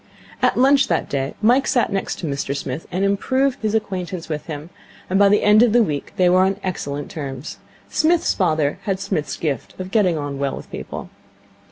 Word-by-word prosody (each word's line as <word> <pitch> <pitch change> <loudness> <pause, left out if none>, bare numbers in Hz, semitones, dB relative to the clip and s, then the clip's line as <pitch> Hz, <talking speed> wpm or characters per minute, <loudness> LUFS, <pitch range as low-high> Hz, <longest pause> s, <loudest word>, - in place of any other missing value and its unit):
At - - +2
lunch 275 +2 +5
that 165 - 0
day 135 0 -2
Mike 250 +5 +4
sat 245 -4 +2
next 195 - -2
to - - -5
Mr 140 -1 -2
Smith, 140 +2 -5
and 185 +2 0
improved 260 +7 +1
his 215 0 0
acquaintance 185 -5 -3
with 150 -1 -4
him; 155 +1 -7 0.4
and 190 - +3
by 200 -1 +6
the 205 - +3
end 210 +1 +6
of 240 -3 +4
the 240 -1 +6
week 150 -8 -4
they 180 - +3
were 180 +1 +5
on 190 +1 +2
excellent 145 -6 -4
terms. 140 -2 -6 0.3
Psmith's 330 +1 +2
father 155 -5 +1
had 195 -2 -1
Psmith's 195 -7 -2
gift 145 -1 -4
of 185 0 -6
getting 190 -7 +3
on 145 -2 -4
well 140 -1 -1
with - - -11
people. - - -7
185 Hz, 200 wpm, -21 LUFS, 145-210 Hz, 0.4 s, by